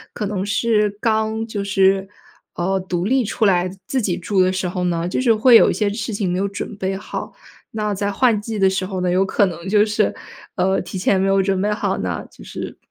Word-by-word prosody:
可 210 - -3
能 200 -1 -3
是 210 0 +2
刚 220 0 0
就 210 -3 -4
是， 195 -1 +2 0.5
呃， 190 +2 0
独 180 -1 -3
立 255 +4 +2
出 215 +2 -1
来 180 -1 +2 0.2
自 265 - -1
己 190 -6 -1
住 195 +1 0
的 185 0 +4
时 185 -1 -2
候 180 0 -3
呢， 170 0 -1
就 185 - -1
是 235 -3 +4
会 235 +2 +6
有 - - +7
一 - - +1
些 210 -2 0
事 225 0 -4
情 200 -3 -1
没 180 - -1
有 200 - 0
准 200 +1 -6
备 190 -1 -2
好。 - - -6 0.4
那 210 -1 -2
在 200 +1 -1
换 230 -1 +2
季 220 +1 -5
的 190 -1 +4
时 190 -1 -2
候 190 -1 -4
呢， 180 -1 0
有 185 +2 +2
可 200 +1 +2
能 170 +1 -6
就 210 +1 +4
是， 210 -1 0 0.4
呃， 190 +1 +1
提 - - -8
前 190 +1 +2
没 195 - +1
有 195 0 +3
准 190 -1 0
备 210 +1 0
好 210 - -1
呢， - - -3
就 - - -15
是 - - -7
195 Hz, 255 characters per minute, -20 LUFS, 185-215 Hz, 0.5 s, 有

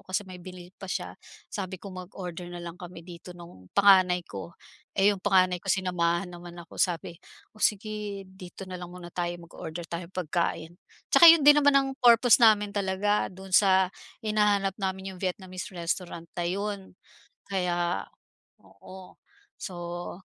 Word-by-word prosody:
kasi 185 +1 -1
may 185 - -8
binili 180 0 -10
pa - - -10
siya, - - -4 0.3
sabi 190 -2 -5
ko 200 - -8
mag-order 180 -1 -7
na 175 - -7
lang 170 0 -8
kami 180 -1 -10
dito 175 +1 -11
nung 170 - -14
panganay 185 -3 +5
ko. 170 - -8 0.4
Eh, 195 0 +3
yung 200 -2 +1
panganay 185 -2 +4
ko, 195 - +2
sinamahan 180 -1 0
naman 175 0 -10
ako, 170 - -13
sabi, 170 -1 -1 0.4
"O - - -16
sige, 210 -2 -2
dito 190 0 -11
na 185 - -6
lang 175 -1 -9
muna 180 -1 -9
tayo, 175 0 -3
mag-order 170 0 -8
tayong 170 +1 -6
pagkain." 170 -1 -2 0.3
Tsaka 340 - +6
yun 335 - +4
din 295 +1 +7
naman 285 0 +5
ang 270 0 +3
purpose 240 -3 +6
namin 215 -3 +5
talaga, 200 +1 0
dun 190 +1 -11
sa 190 -2 +5 0.3
hinahanap 210 -3 +1
namin 190 -1 -4
yung - - -15
Vietnamese 185 +2 -5
restaurant 170 -1 -4
na 175 - -1
'yon, 200 +2 -3 0.6
kaya, 175 - -1 0.5
oo. 185 - -14 0.4
So 175 0 -6
185 Hz, 155 wpm, -27 LUFS, 175-200 Hz, 0.6 s, din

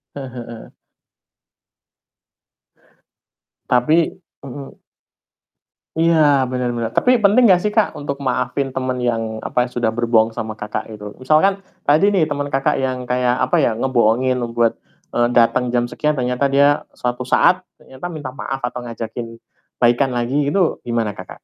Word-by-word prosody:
Heeh 135 -3 -7
heeh. 115 -2 -10 2.9
Tapi 155 +8 +3 0.3
mhm. 135 +1 -9 1.2
Iya, 155 -4 +4
benar 125 -1 -1
benar. 115 -1 -3
Tapi 250 - +2
penting 225 +5 +5
gak 180 -3 +5
sih 210 - 0
Kak, 215 0 +1
untuk 140 -1 -5
maafin 135 +1 -1
teman 130 -1 -2
yang 115 -2 -2
apa, 125 - 0
sudah 115 -2 -1
berbohong 115 -1 +2
sama 110 0 -4
Kakak, 105 +1 -5
gitu. 105 -1 -9
Misalkan, 190 +9 +2 0.2
tadi 160 +8 +4
nih 180 -6 +2
teman 145 -1 -3
Kakak, 135 0 +1
yang 130 -2 -2
kayak, 125 0 +1
apa 130 0 +1
ya, - - +3
ngebohongin 125 0 +1
buat, 115 -1 +1 0.4
eee, 120 0 +3
datang 120 +1 +3
jam 120 0 +1
sekian 150 +4 -1
ternyata 130 0 -1
dia 140 +1 +3 0.2
suatu 125 +1 -2
saat 180 +8 +3 0.2
ternyata 135 +7 -8
minta 155 -4 -6
maaf 135 -1 -4
atau 125 0 -4
ngajakin 115 0 -7 0.4
baikan 120 +3 +3
lagi 120 +2 -2 0.2
gitu 185 -4 0
gimana, 115 -4 -2
Kakak? 95 - -10
125 Hz, 145 wpm, -19 LUFS, 120-145 Hz, 2.9 s, penting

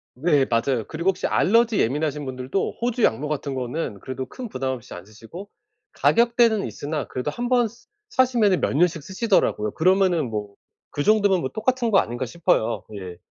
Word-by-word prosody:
네, 145 -1 +2
맞아요. 115 -1 0
그리고 170 +4 -1
혹시 190 - -1
알레르기 230 +1 +3
예민하신 145 +3 0
분들도 130 +7 -3
호주 240 -1 0
양모 135 +7 +2
같은 145 -2 -3
거는 125 -3 -4
그래도 130 +4 -5
큰 245 - -8
부담 130 -5 -2
없이 125 -1 -7
안 90 +1 -9
쓰시고, 115 - -11 0.4
가격대는 235 -2 +3
있으나 150 0 -4
그래도 130 +3 -3
1 240 +8 -4
번 245 -2 +3
스 235 +2 -18 0.2
사시면은 235 -7 +2
몇 - - 0
년씩 165 -2 +2
쓰시더라고요. 190 - 0
그러면은 180 -4 +2
뭐, 105 -2 -5 0.4
그 145 - -2
정도면 205 -4 +3
뭐 130 - -2
똑같은 240 +1 0
거 195 - +6
아닌가 120 +3 -2
싶어요. 120 -6 0
예. 90 -3 -8
155 Hz, 390 characters per minute, -23 LUFS, 130-215 Hz, 0.4 s, 거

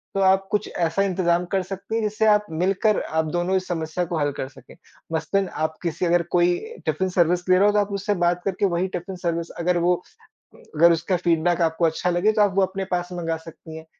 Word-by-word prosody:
तो 195 - +1
आप 190 0 +3
कुछ 210 - 0
ऐसा 170 +2 0
इंतजाम 180 -2 +1
कर 195 - +2
सकती 195 +4 -6
हैं 230 - +1
जिससे 215 +1 0
आप 210 0 +4
मिलकर 195 +5 +1
आप 160 0 -1
दोनों 175 +2 0
इस 185 - -4
समस्या 165 +1 -2
को 170 0 -3
हल 145 0 +1
कर 130 - -3
सकें। 135 0 -16 0.4
मसलन 185 +5 0 0.2
आप 155 0 -1
किसी 170 +1 -1
अगर 175 0 +3
कोई 175 0 +3 0.3
टिफ़िन 190 0 0
सर्विस 180 0 +2
ले 185 - +6
रहा 200 - +4
हो, 210 - +4
तो 210 - +3
आप 205 0 -1
उससे 205 +1 -1
बात 175 0 +1
करके 195 +1 0
वही 180 0 0
टिफ़िन 185 +2 -7
सर्विस 170 -2 -3
अगर 175 +1 +1
वो 175 +1 +3 0.6
अगर 450 - +3
उसका 170 +3 0
फीडबैक 170 0 +1
आपको 165 +1 +1
अच्छा 165 +2 0
लगे, 175 +5 +2
तो 215 -1 +1
आप 205 -2 +3
वो 195 - +4
अपने 190 0 -2
पास 175 0 -1
मँगा 165 -2 -2
सकती 160 0 -11
हैं। 160 - -11
180 Hz, 225 wpm, -23 LUFS, 170-195 Hz, 0.6 s, ले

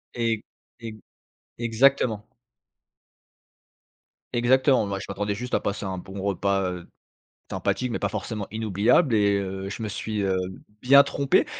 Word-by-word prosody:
E 115 -2 0 0.4
e 110 -2 -8 0.6
exactement. 115 -1 +2 2.1
Exactement. 130 0 +3
Moi 100 -1 -3
je - - -7
m'attendais 100 +1 -2
juste 125 +5 -3
à - - +2
passer 100 0 -3
un 95 -1 -4
bon 95 +2 -8
repas, 100 0 0
heu, 90 -1 -8 0.6
sympathique, 125 -1 -1
mais - - -2
pas 100 - -1
forcément 105 0 -4
inoubliable 110 - +2
et 100 -1 +3
heu, 95 0 -4
je 105 +3 -6
me 110 - -2
suis, 105 0 -3
heu, 95 -1 +1 0.5
bien 140 +2 +8
trompé 140 -1 +1
105 Hz, 140 wpm, -25 LUFS, 100-120 Hz, 2.1 s, bien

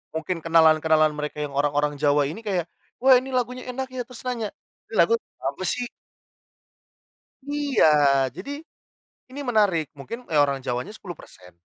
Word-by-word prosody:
mungkin 165 +2 -2
kenalan-kenalan 160 -1 +5
mereka 150 0 -4
yang 145 - -4
orang-orang 145 0 +1
Jawa 145 0 +3
ini 165 - -7
kayak, 180 -4 -1 0.3
"Wah, 260 -1 +8
ini 260 +1 -8
lagunya 250 0 -2
enak 265 +1 -4
ya," 255 -1 -4
terus 250 -2 -10
nanya, 235 -4 -3 0.4
"lagu 460 - +4 0.3
apa - - -3
sih?" 245 -1 -1 1.6
Iya, 150 - +3
jadi 280 - -7 0.7
ini 260 +3 -9
menarik. 205 - +1
Mungkin 195 - -8
orang 140 -3 +2
Jawanya 125 - -3
10%, 150 - -12
165 Hz, 135 wpm, -24 LUFS, -, 1.6 s, Wah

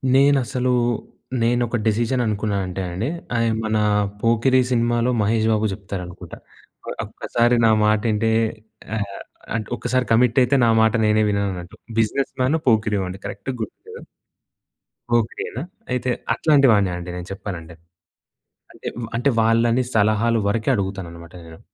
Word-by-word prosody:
నేనసలు 130 -3 +3 0.7
నేను 120 +1 +2
ఒక 120 - -1
డెసిషన్ 120 +3 +1
అనుకున్నానంటే 100 -3 -2
అండి 95 +8 -2 0.3
ఆయ్ 115 0 +2
మన 110 0 0 0.4
'పోకిరి' 115 +3 +3
సినిమాలో 120 +1 +2
మహేష్ 110 +1 +1
బాబు 110 0 +1
చెప్తారనుకుంటా. 95 -3 -8 0.7
"ఒక్కసారి 120 +1 +1
నా 110 - +5
మాటింటే 110 +1 +2 0.7
ఆహ్, 100 -2 -4 0.4
అన్ 110 - -2
ఒక్కసారి 125 0 0
కమిట్ 120 +2 +3
అయితే 125 +3 +2
నా - - +3
మాట 110 0 +3
నేనే 105 0 +3
విననున్నట్టు" 95 -3 -3 0.2
బిజినెస్ 135 +5 0
మానొ, 145 +6 +2
పోకిరిఓ 110 -3 +2
అండి 95 +2 -8
కరెక్ట్ 100 +6 -6
గుర్తులేదు. 110 - -9 1.1
పోకిరియేన? 120 +1 -1 0.3
అయితే 125 0 -1 0.2
అట్లాంటి 140 +1 +4
వాడినే 100 -3 +3
అండి 90 0 -7
నేను 90 0 -7
చెప్పాలంటె. 90 -4 -7 1.0
అంటే - - -10
వ్ 115 - -3
అంటే 125 +4 +2
వాళ్ళని 115 +2 +3
సలహాలు 110 +2 +3
వరకే 110 +4 0
అడుగుతాను 95 -3 -3
అన్నమాట 85 0 -12
నేను. 80 0 -13
110 Hz, 130 wpm, -22 LUFS, 100-120 Hz, 1.1 s, నా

